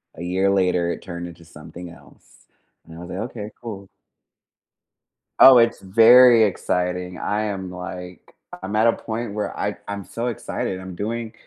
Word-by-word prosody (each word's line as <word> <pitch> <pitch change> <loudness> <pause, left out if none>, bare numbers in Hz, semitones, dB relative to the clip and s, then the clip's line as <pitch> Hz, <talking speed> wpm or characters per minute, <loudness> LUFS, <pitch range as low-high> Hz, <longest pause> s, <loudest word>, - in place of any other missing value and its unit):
a 85 - -8
year 95 +2 0
later, 90 -3 +1
it - - -6
turned 85 -2 -7
into 85 -1 -14
something 85 +2 -11
else - - -20 0.4
and 80 0 -13
I - - -10
was 90 +1 -9
like, 95 - -5
"Okay. 105 -2 -8
Cool." 100 -5 -8 1.5
Oh, 130 -2 +9
it's 115 0 +2
very 115 +4 +7
exciting. 90 -2 -2
I 105 +1 -1
am, 95 -3 -4
like 90 0 -9 0.3
I'm 100 +2 -4
at 110 +2 +3
a 115 - +4
point 115 -1 -5
where 105 -1 -4
I 105 0 -2
I'm 100 -1 -5
so 115 +7 -5
excited. 95 -4 -4
I'm 95 -1 -9
doing 115 +2 -4
95 Hz, 165 wpm, -22 LUFS, 90-110 Hz, 1.5 s, Oh